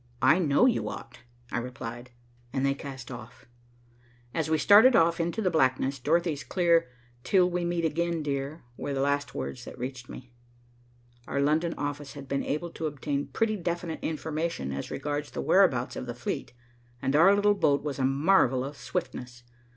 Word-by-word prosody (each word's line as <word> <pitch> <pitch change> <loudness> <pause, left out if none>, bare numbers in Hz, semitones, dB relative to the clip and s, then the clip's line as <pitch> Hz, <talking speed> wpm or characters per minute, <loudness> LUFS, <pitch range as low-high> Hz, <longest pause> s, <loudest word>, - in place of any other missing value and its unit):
"I 155 - +6
know 155 - +4
you 255 - +1
ought," - - -9 0.3
I - - 0
replied, 120 0 -7 0.4
and 135 +2 0
they 140 - +3
cast 135 -2 -8
off. 120 -1 -10 0.9
As 160 -2 -1
we 160 - +3
started 215 - +7
off 165 -1 +4
into 170 +6 -1
the 185 - +2
blackness, 130 -2 +1
Dorothy's 160 +1 +1
clear 170 -6 +2 0.3
"Till 185 -2 +4
we 180 0 -2
meet 170 -1 0
again, 165 +1 -1
dear," 140 +2 -3
were 140 - -3
the - - -1
last 140 0 0
words 125 - -5
that - - -9
reached 125 0 -6
me. 125 -1 -10 0.9
Our 140 - -1
London 155 +4 +1
office 145 -1 -4
had 140 -2 -9
been 140 0 -1
able 165 +3 -3
to 160 - -3
obtain 145 -1 -3
pretty 225 -1 0
definite 170 -2 -3
information 155 - -3
as 70 0 -4
regards 145 0 -3
the - - -4
whereabouts 155 -11 +3
of 125 - -5
the 120 - -5
fleet, 120 - -4 0.5
and 135 +3 0
our 180 +6 +7
little 205 0 +4
boat 145 -8 +2
was 145 -2 -4
a - - +1
marvel 135 -1 +3
of 140 +1 -7
swiftness. 125 -1 -5
145 Hz, 175 wpm, -28 LUFS, 135-170 Hz, 0.9 s, started